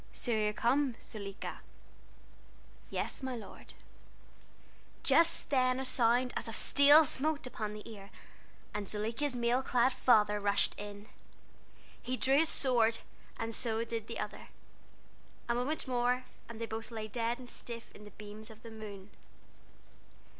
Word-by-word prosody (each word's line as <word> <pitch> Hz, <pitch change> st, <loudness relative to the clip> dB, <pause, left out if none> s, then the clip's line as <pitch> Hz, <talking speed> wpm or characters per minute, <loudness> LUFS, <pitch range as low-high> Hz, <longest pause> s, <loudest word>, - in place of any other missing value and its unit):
"'So 245 Hz, -, -1 dB
you 215 Hz, -2 st, +2 dB
are -, -, -4 dB
come, 255 Hz, +3 st, +2 dB
Zuleika?' 200 Hz, -3 st, -6 dB, 1.3 s
"'Yes, -, -, -1 dB
my 260 Hz, -1 st, -3 dB
lord.' 225 Hz, -, -10 dB, 1.3 s
"Just 335 Hz, -2 st, +3 dB
then 255 Hz, -1 st, +3 dB
a 265 Hz, -, -2 dB
sound 245 Hz, 0 st, +3 dB
as -, -, -2 dB
of 225 Hz, -, -5 dB
steel 290 Hz, +2 st, +7 dB
smote 295 Hz, +2 st, -1 dB
upon 215 Hz, -4 st, -4 dB
the 210 Hz, -, -9 dB
ear, 200 Hz, -3 st, -10 dB, 0.6 s
and 210 Hz, -1 st, -3 dB
Zuleika's 230 Hz, +6 st, -1 dB
mail 240 Hz, +1 st, +2 dB
clad 255 Hz, 0 st, +2 dB
father 210 Hz, -5 st, +4 dB
rushed 200 Hz, 0 st, +3 dB
in. 205 Hz, 0 st, -7 dB, 1.0 s
He 255 Hz, +1 st, -2 dB
drew 270 Hz, +3 st, +4 dB
his 320 Hz, 0 st, +3 dB
sword, 230 Hz, -4 st, +2 dB, 0.5 s
so 225 Hz, 0 st, -1 dB
did 230 Hz, -2 st, -4 dB
the 230 Hz, -, -5 dB
other. 210 Hz, -, -5 dB, 1.0 s
A 235 Hz, -, +2 dB
moment 260 Hz, +5 st, -1 dB
more, 250 Hz, 0 st, +1 dB, 0.2 s
and 230 Hz, -1 st, -8 dB
they 230 Hz, -, -2 dB
both 225 Hz, 0 st, -6 dB
lay 220 Hz, -2 st, -5 dB
dead 230 Hz, +2 st, -1 dB
and 250 Hz, -1 st, -11 dB
stiff 235 Hz, -1 st, -8 dB
in 210 Hz, -, -13 dB
the 210 Hz, -, -10 dB
beams 210 Hz, +2 st, -10 dB
of 220 Hz, +1 st, -14 dB
the 230 Hz, -, -9 dB
moon. 210 Hz, -2 st, -9 dB
235 Hz, 145 wpm, -33 LUFS, 215-255 Hz, 1.3 s, steel